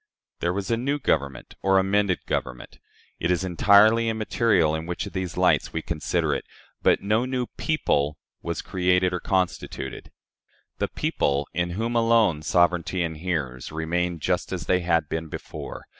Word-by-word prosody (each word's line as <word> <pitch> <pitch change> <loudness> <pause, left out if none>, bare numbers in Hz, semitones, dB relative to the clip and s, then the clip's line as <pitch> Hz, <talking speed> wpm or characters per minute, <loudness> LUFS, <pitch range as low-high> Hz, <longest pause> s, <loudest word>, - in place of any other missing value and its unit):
There 85 - 0
was 100 +3 -3
a 115 - +2
new 140 +5 -1
Government 70 - -1
or 95 0 +3
an 95 - +3
amended 100 -2 +1
Government 60 -1 -4 0.4
it - - -1
is 90 0 +1
entirely 105 +5 +5
immaterial 110 -6 +2
in 80 +1 -3
which 90 - -3
of - - -9
these 95 -3 -4
lights - - +2
we 80 - -3
consider 80 -3 -1
it - - -2 0.4
but - - +3
no 105 +4 +2
new 130 -1 -1
PEOPLE 75 - 0 0.2
was - - -4
created 90 0 +1
or 90 - -1
constituted. 95 0 -2 0.7
The - - +1
people, 70 0 -1
in 85 0 -1
whom 115 +2 -1
alone 115 -8 +3
sovereignty 90 +2 +2
inheres, 80 -6 -3
remained 85 +1 -2
just 90 +4 -1
as 90 -3 -4
they 90 - +2
had 85 -3 +1
been 80 +1 -3
before. - - -8
90 Hz, 160 wpm, -25 LUFS, 80-100 Hz, 0.7 s, entirely